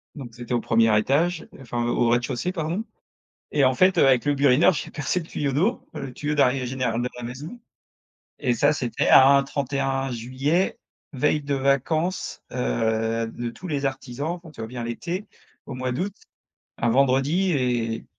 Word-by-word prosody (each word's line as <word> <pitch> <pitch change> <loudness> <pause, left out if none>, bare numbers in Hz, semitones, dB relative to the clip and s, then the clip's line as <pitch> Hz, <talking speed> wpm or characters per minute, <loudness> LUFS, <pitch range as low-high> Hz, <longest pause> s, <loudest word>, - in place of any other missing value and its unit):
donc 125 -6 -9
c'était 120 +1 -6
au 120 - +1
1er 115 -2 +3
étage, 160 +9 +1
enfin 120 -2 -3
heu, - - 0
au 120 -1 +2
rez-de-chaussée 120 +6 0
pardon. 175 +4 -2 0.7
Et 145 -2 +3
en 130 0 +4
fait, 185 +6 +3
heu, - - +6
avec 130 -1 +4
le 145 0 +2
burineur 140 +6 +5
j'ai 150 - -5
percé 150 +5 -1
le 165 - -9
tuyau 145 -4 -2
d'eau. 185 - 0
Le 135 -2 -6
tuyau 150 +3 -3
d'arrivée 130 -2 +2
général 125 -2 -1
de 125 - -1
la 125 - -8
maison 145 - -8 0.8
et 125 -4 +1
ça 145 +6 +3
c'était 125 -5 -1
un 140 +1 +7
31 135 -1 -2
juillet, 130 +9 -1 0.3
veille 150 +3 +1
de 140 0 -1
vacances, 140 +6 0
heu, 110 - 0
de 120 0 -4
tous 180 +11 -9
les 140 -3 -1
artisans, 135 +2 -4
enfin 170 -2 -13
tu 150 - -12
vois 110 - -4
bien 120 0 -6
l'été, 170 - -4 0.4
au 135 - -6
mois 130 0 -2
d'août, 185 +10 -3 0.6
un 120 - +1
vendredi 140 +9 +2
et 120 -5 -1
135 Hz, 180 wpm, -24 LUFS, 120-150 Hz, 0.8 s, un